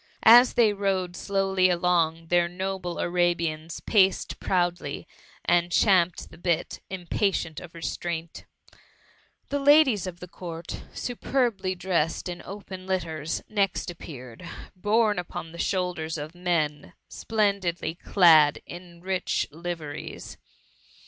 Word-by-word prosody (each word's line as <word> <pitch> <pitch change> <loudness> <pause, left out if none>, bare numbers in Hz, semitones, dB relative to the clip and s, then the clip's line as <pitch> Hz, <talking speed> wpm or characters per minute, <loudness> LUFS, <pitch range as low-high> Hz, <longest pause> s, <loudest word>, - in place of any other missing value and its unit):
As 240 +2 +8
they 220 -3 +4
rode 190 -3 -1
slowly 195 -2 +1
along, 170 -2 +1
their 175 -1 +3
noble 185 0 -4
Arabians 170 -2 -1
paced 195 -3 +2
proudly, 175 -1 -1 0.4
and 175 0 +2
champed 180 -1 +3
the - - -14
bit, 170 -2 -1
impatient 180 -3 -1
of 175 -1 -12
restraint 165 0 -5 1.0
The 285 - -1
ladies 275 - +5
of 175 -1 -7
the 180 - -9
Court, 170 -2 -7
superbly 235 -6 -1
dressed 175 -3 -1
in 175 -1 -5
open 190 -1 -9
litters, 165 -4 -2
next 200 -4 0
appeared, 130 -8 -10 0.3
borne 210 +2 +2
upon 165 -2 -6
the 170 - -11
dioulders 180 -4 -1
of 150 +2 -6
men 170 -5 -1
splendidly 200 -7 -1
clad 160 -4 +5
in 175 -1 -11
rich 185 0 -1
live 170 +2 -5
ries. 145 -1 -8
175 Hz, 115 wpm, -26 LUFS, 170-195 Hz, 1.0 s, As